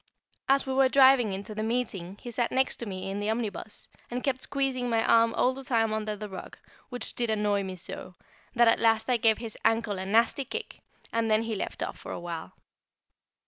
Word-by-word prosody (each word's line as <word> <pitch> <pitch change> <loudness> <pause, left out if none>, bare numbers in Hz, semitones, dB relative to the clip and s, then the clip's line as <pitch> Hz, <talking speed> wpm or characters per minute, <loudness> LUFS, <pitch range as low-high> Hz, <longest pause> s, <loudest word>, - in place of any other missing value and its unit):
As 275 0 +4
we 265 - -2
were 265 0 +4
driving 260 -5 +6
in 190 +1 -4
to 215 - -8
the 215 - -4
meeting 215 -5 -2
he 240 - -8
sat 235 0 -1
next 260 -2 +1
me 190 -3 -5
in 200 - -3
the 205 +1 -2
omnibus, 220 -2 -4 0.2
and 245 +1 -4
kept 260 -2 -1
squeezing 265 -3 -1
my 225 -1 +2
arm 230 0 +5
all 255 - +3
the 270 +1 -9
time 225 -4 +1
under 215 -1 -2
the 210 +1 -6
rug, 190 -2 -9 0.3
which 245 -1 0
did 235 -1 -1
annoy 210 -2 +1
me 190 -1 -5
so, 180 0 -6 0.4
that 240 0 +5
at 230 - +4
last 225 +2 +2
I 245 - +4
gave 225 -1 +4
his 225 -2 -7
ankle 225 -3 +1
a 190 - -4
nasty 230 +6 +3
kick, 445 - -6 0.3
and 230 0 +1
then 215 +1 +3
he 225 -1 -3
left 205 - -4
off - - -5
for - - -8
a - - -4
little. 170 - -6
225 Hz, 220 wpm, -28 LUFS, 205-250 Hz, 0.4 s, driving